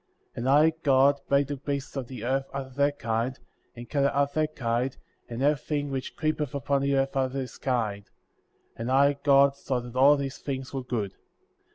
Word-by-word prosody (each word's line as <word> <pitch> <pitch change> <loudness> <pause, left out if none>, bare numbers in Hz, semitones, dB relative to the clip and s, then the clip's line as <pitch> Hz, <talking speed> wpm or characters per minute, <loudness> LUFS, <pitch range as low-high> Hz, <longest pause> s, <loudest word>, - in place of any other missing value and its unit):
And 125 +3 -2
I, 150 +4 +6
God, 140 -1 +4
made 140 0 +4
the 145 - -3
beasts 140 +1 -4
of 135 -3 -4
the 125 -4 -8
earth 135 +2 -1
after 135 -1 -5
their 140 +2 +2
kind, 115 -1 -2 0.4
and 120 0 -9
cattle 140 +2 +2
after 140 0 0
their 155 - +3
kind, 125 -3 -2 0.3
and 120 +2 -3
everything 145 0 0
which 135 -1 -4
creepeth 155 -3 -1
upon 140 0 0
the 140 0 +1
earth 135 0 0
after 130 0 0
his 130 -2 -5
kind; 110 -6 -2 0.7
and 115 +2 -4
I, 140 +2 +4
God, 140 -1 +5
saw 135 -2 -2
that 120 0 -9
all 140 +3 +6
these 135 -1 -4
things 135 -2 -5
were 135 - -2
good. 110 -6 -3
135 Hz, 190 wpm, -27 LUFS, 125-140 Hz, 0.7 s, I